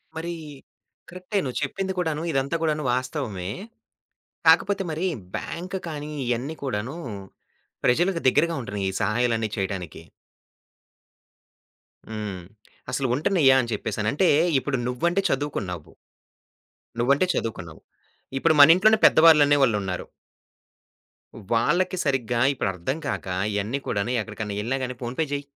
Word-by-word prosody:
మరి 170 +2 -4 0.8
కరెక్టే. 185 +4 -3
నువ్వు 130 -3 -4
చెప్పింది 190 +7 -2
కూడాను 160 -3 -1
ఇదంతా 135 +2 0
కూడాను 155 -2 0
వాస్తవమే. 125 - -3 1.0
కాకపోతే 200 -1 +5
మరి, 160 +4 -2 0.3
బ్యాంక్ 180 +3 -5
కానీ, 150 -1 -6 0.2
ఇయన్నీ 125 +6 -2
కూడాను 125 +3 -3 0.9
ప్రజలకు 170 +8 +2
దగ్గరగా 165 +5 +2
ఉంటున్నాయి 100 -5 -3
ఈ - - -7
సహాయాలు 115 +3 +1 0.2
చేయటనికి. 95 -4 -4 2.0
హ్మ్. 105 -4 -5 0.5
అసలు 135 - 0
ఉంటనయ్య 140 -1 +4
అని 120 -1 -5
చెప్పేసని. 105 0 -3
అంటే, 175 +5 +3 0.3
ఇప్పుడు 135 0 -2
నువ్వంటే 170 +10 0
చదువుకున్నావు. 100 - -3 1.1
నువ్వంటే 140 +8 +3
చదువుకున్నావు. 90 -8 -5 0.6
ఇప్పుడు 160 +2 +3
మన 145 +3 +10
ఇంట్లోనే 215 +4 +4
పెద్దవాళ్ళనే 150 -3 +6
వాళ్ళున్నారు. 100 -7 -1 1.5
వాళ్ళకి 180 +11 +1
సరిగ్గా 125 -4 0
ఇప్పుడు 115 - -1
అర్థం 90 - -3
కాక - - -3 0.3
ఇయన్ని 105 +7 -1
కూడాను 100 +4 -1
ఎక్కడికైనా 105 -1 -5
ఎళ్ళినా 125 +5 -1
గాని 125 0 -4
ఫోన్ 120 +1 -4
పే 160 - +2
జెయ్, 145 0 -3
135 Hz, 115 wpm, -24 LUFS, 110-160 Hz, 2.0 s, మన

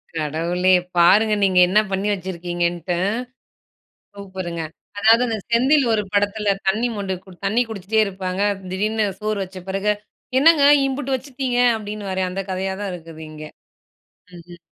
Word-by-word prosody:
கடவுளே! 170 +4 +1 0.2
பாருங்க 210 +5 +5
நீங்க 185 -2 +4
என்ன 205 +4 +4
பண்ணி 195 +2 -1
வச்சிருக்கீங்கன்ட்டு 175 -1 -3
ம். 205 - 0 1.0
சூப்பருங்க 185 -4 -6 0.4
அதாவது 225 +3 +5
அந்த 225 -2 -2
செந்தில் 265 +4 +4
ஒரு 210 -1 +1
படத்துல 205 0 +1
தண்ணி 220 +5 +1
மொண்டு 195 -2 -3
கொடு 185 -2 -15
தண்ணி 225 +5 +2
குடிச்சிட்டே 220 +1 -1
இருப்பாங்க, 190 -1 -4 0.3
திடீர்னு 215 +3 0 0.2
சோறு 215 -1 -2
வச்ச 190 0 -8
பெறகு, 195 +2 0 0.5
"என்னங்க 305 0 +5 0.2
இம்புட்டு 270 0 -2
வச்சிட்டீங்க" 255 -1 -3 0.2
அப்டின்னுவாரே 205 -3 -4
அந்த 195 +1 -3
கதயா 190 +1 -2
தான் 195 -2 -3
இருக்குது 165 -2 -10
இங்கே. 155 0 -9 0.9
ம்ஹ்ம். 175 0 -13
195 Hz, 135 wpm, -21 LUFS, 180-220 Hz, 1.0 s, பாருங்க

